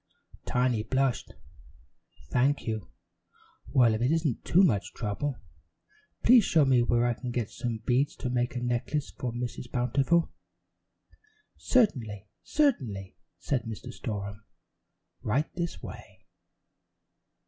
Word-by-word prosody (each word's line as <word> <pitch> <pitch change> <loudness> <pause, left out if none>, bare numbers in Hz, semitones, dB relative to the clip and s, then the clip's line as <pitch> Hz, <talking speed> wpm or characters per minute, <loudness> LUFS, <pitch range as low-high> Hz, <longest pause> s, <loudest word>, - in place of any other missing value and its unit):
Tiny 125 -3 +1
blushed. 130 +2 0 1.0
"Thank 135 +4 +2
you. 110 -4 -3 0.8
Well, 125 -5 +4
if 110 - -2
it 125 - +2
isn't 160 -6 0
too 185 +4 +4
much 105 - +1
trouble, 125 +6 -3 0.9
please 240 -1 +7
show 160 -6 +4
me 130 -2 +4
where 120 0 +2
I 120 - +2
can 125 +2 -6
get 120 -3 -2
some 115 -3 -4
beads 130 +3 +2
to 125 - -4
make 120 0 0
a 120 - -2
necklace 120 +4 -1
for 125 - -4
Mrs. 120 +1 -5
Bountiful." 135 +7 +2 1.2
"Certainly, 115 - +1 0.2
certainly," 120 - 0 0.2
said 125 -5 -1
Mr. 115 +3 -7
Storem. 100 -3 -5 0.8
"Right 135 +8 0
this 170 -1 -4
way." - - -11
125 Hz, 120 wpm, -29 LUFS, 115-140 Hz, 1.2 s, please